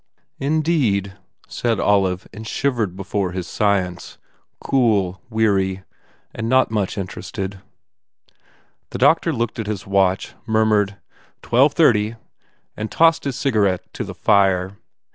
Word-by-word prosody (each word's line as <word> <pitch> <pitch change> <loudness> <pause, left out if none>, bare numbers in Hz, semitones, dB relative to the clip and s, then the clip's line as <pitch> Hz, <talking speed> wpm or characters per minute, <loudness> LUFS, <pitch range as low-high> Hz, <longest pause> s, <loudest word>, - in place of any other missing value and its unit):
"Indeed," 135 - 0 0.3
said 115 -2 -1
Olive 95 -3 +1
and 110 +1 -8
shivered 115 -9 -1
before 95 -1 -3
his 90 -1 -4
science, 95 -2 -1 0.4
cool, 105 -8 +1
weary, 95 -4 +1 0.5
not 115 +2 +2
much 105 -3 -1
interested. 95 0 -5 1.3
The - - -5
doctor - - +3
looked 115 0 -3
at 110 - -3
his 100 -3 -4
watch, 95 -1 +1
murmured, 110 -2 +2 0.5
"Twelve 135 +5 +3
thirty," 110 -8 +3 0.6
and 110 0 -4
tossed 165 -2 +3
his 135 -3 -2
cigarette 105 -10 +1
in - - -3
the - - -7
fire. 95 -1 +2
105 Hz, 115 wpm, -21 LUFS, 95-115 Hz, 1.3 s, doctor